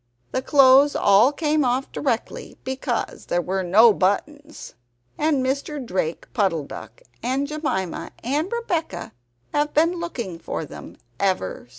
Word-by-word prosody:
The 260 - -1
clothes 275 +1 +6
all 205 +6 +5
came 300 0 +1
off 255 +1 0
directly, 245 -5 -3
because 260 -2 -3
there 175 - +1
were 190 +2 -1
no 210 +5 +6
buttons. 290 +11 -2 0.4
And 295 -4 +1
Mr. 280 +3 -2
Drake 180 -5 -2
Puddle 185 -8 +1
duck, - - -10 0.2
and 265 +3 0
Jemima 280 - -3
and 295 +9 -1
Rebeccah, 380 -9 -3 0.4
have 295 0 0
been 335 +3 +3
looking 235 - -5
for 165 - -4
them - - -11 0.2
ever 185 - -1
since. - - -31
260 Hz, 140 wpm, -23 LUFS, 195-300 Hz, 0.4 s, clothes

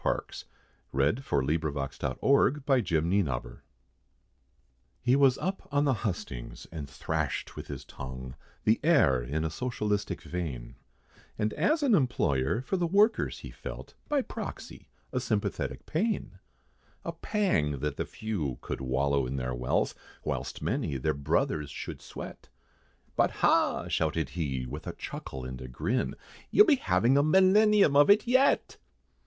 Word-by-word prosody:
[Illustration: - - -2 0.5
PARADOXICAL 70 - 0
WORDS] 100 - +2 1.4
HE 125 +2 +4
was 135 -2 +5
up 190 +1 -3
on 145 +1 +2
the 135 - +3
hustings, 90 - -5
and 75 -4 -6
thrashed 70 - -3
with - - -7
his - - -7
tongue, 65 -1 -8 0.3
The 110 +1 +3
air 90 - +4
in 75 +7 -2
a 80 - -2
socialistic 105 -1 -2
vein, 75 -9 -5 0.6
And 105 0 0
as 300 - +1
an 265 -5 +4
employer, 120 - +1
for 190 - -1
the 175 -1 +1
workers 205 +5 +2
he - - -8
felt, - - -8 0.2
By 290 -3 +2
proxy, - - -7 0.2
a - - 0
sympathetic - - -2
pain! 170 - -1 0.7
A 170 - -2
pang, 165 - 0
that 75 -1 -2
the - - -1
few 90 - -3
could - - -5
wallow 70 +1 +1
in 65 - -3
their 65 -1 -2
wealth, 60 0 0 0.3
Whilst - - -3
many 70 - -1
their 75 +4 0
brothers 70 +1 0
should - - -7
sweat, - - -9 0.7
"But - - +4
ha!" - - +2
shouted 80 -2 0
he, 70 -4 -2
with 75 +5 -7
a - - -3
chuckle, 65 -1 -6
and 65 0 -6
a 65 - -6
grin, 115 - -1 0.3
"You'll 420 - +7
be 305 -7 +5
having 115 - +3
a - - +4
millenium 190 +1 +5
of 145 +4 +6
it 205 +4 +6
yet!" 260 +3 +3
90 Hz, 140 wpm, -29 LUFS, -, 1.4 s, You'll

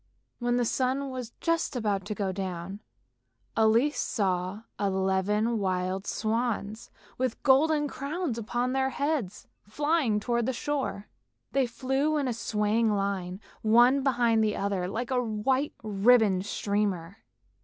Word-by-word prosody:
When 240 0 +1
the 245 - +2
sun 265 +3 0
was 250 -3 -5
just 330 -4 0
about 205 -5 -1
to 210 0 -4
go 195 -1 -1
down, 185 0 -5 0.8
Elise 230 +7 +3
saw 190 0 -1 0.2
eleven 200 +3 +1
wild 185 0 -1
swans 220 -1 -2 0.3
with 255 -3 -2
golden 295 +2 +4
crowns 280 -2 -3
upon 240 +3 -1
their 265 0 +1
heads 280 - -2 0.2
flying 290 -2 +1
towards 235 +2 0
the 260 - 0
shore. 265 -6 -3 0.4
They 270 -2 +2
flew 265 +5 0
in 280 -3 0
a 245 - 0
swaying 220 0 +1
line, 195 -2 -2 0.2
one 240 +5 +5
behind 240 -4 +2
the 210 -1 +1
other, 195 -2 -1
like 230 +6 -4
a 250 -1 +2
white 250 +5 0
ribbon 210 -2 +4
streamer. 200 -2 -2
225 Hz, 135 wpm, -28 LUFS, 200-260 Hz, 0.8 s, one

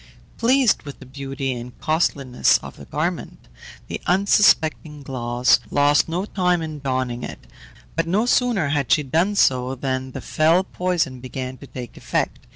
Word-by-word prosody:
Pleased 250 -1 +3
with 145 -2 -9
the 135 - -13
beauty 135 0 -4
and 120 0 -8
costliness 140 -5 +2
of - - -9
the - - -11
garment, - - -4 0.4
the - - -5
unsuspecting 165 -6 +3
Glauce 125 -1 +2
lost 145 +2 +3
no 180 +4 -2
time 180 -4 0
in 155 -2 -6
donning 130 -3 -2
it; - - -8 0.5
but 165 +1 0
no 200 +7 +1
sooner 240 - +2
had 140 -5 -1
she 150 - +4
done 165 +9 +1
so 130 -6 +2
than 130 0 -3
the - - -5
fell 165 +4 +2
poison 180 -9 -2
began 130 0 -6
to 140 - -11
take 125 -2 -9
effect. - - -3
145 Hz, 160 wpm, -22 LUFS, 130-175 Hz, 0.5 s, she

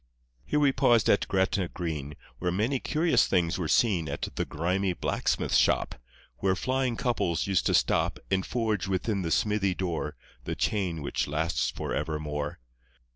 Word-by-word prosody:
Here 150 - +1
we 145 -2 +4
paused 120 -4 +4
at 100 - +2
Gretna 95 -1 +1
Green, 75 -5 -5 0.2
Where 90 - 0
many 115 +9 0
curious 160 +6 +2
things 90 -1 +1
were 85 - -1
seen 90 -6 +2
At 70 - -3
the - - -2
grimy 90 +4 -1
blacksmith's - - 0
shop, - - +2 0.4
Where 95 -1 +1
flying 130 +3 0
couples 90 - 0
used 95 -3 +1
to - - +3
stop - - +2
And 95 -1 +2
forge 110 -4 -1
within 95 +2 -1
the 85 - -2
smithy 100 0 +1
door 85 -5 -3 0.3
The - - -3
chain 90 -7 -1
which - - -1
lasts 80 +4 0
for - - -4
evermore. 75 -1 -3
95 Hz, 160 wpm, -28 LUFS, 80-105 Hz, 0.4 s, we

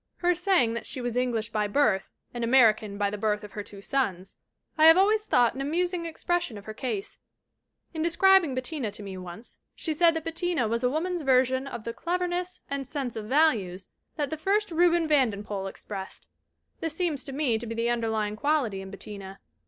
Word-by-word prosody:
Her 355 0 +2
saying 350 - +2
that 235 - -4
she - - -4
was 245 -1 -3
'English 235 -3 -1
by 210 -1 0
birth 205 -4 +2 0.2
and 240 -1 -4
American 220 -4 +4
by 200 -1 0
the 210 - -5
birth 210 0 0
of 210 - -9
her 210 - -5
two 200 -1 -11
sons' 195 -9 -1 0.4
I 315 0 +6
have 325 +2 +9
always 420 +3 +4
thought 245 - +3
an 265 - -5
amusing 340 +4 -1
expression 345 -6 -2
of 200 - -11
her 215 - -6
case. 220 -5 -4 0.7
In 320 - -3
describing 340 -2 +4
Bettina 255 -2 -3
to 210 - -6
me, 195 -1 -7
once, 185 +5 -9 0.2
she 320 - -1
said 330 +1 +4
that 325 - -2
Bettina 330 -5 -1
was 230 +2 -1
a 250 - +2
woman's 345 +5 -1
version 260 -1 +2
of 235 -4 -6
the 230 - -4
cleverness 360 +2 -2
and 275 -2 -4
sense 270 -5 -4
of 220 -1 -5
values 215 - +1 0.3
that 290 -2 -2
the 315 - -2
first 400 +5 0
Reuben 340 0 +3
Vandenpoel 210 -9 0
expressed. 195 0 -8 0.5
This 325 -1 -3
seems 325 -7 0
to 275 - -6
me 265 -5 +1
to 235 - -5
be 230 - -4
the 230 +1 0
underlying 220 -3 -1
quality 250 -6 0
in 190 - -8
Bet 200 - -10
tina. 195 -2 -8
255 Hz, 200 wpm, -27 LUFS, 215-325 Hz, 0.7 s, have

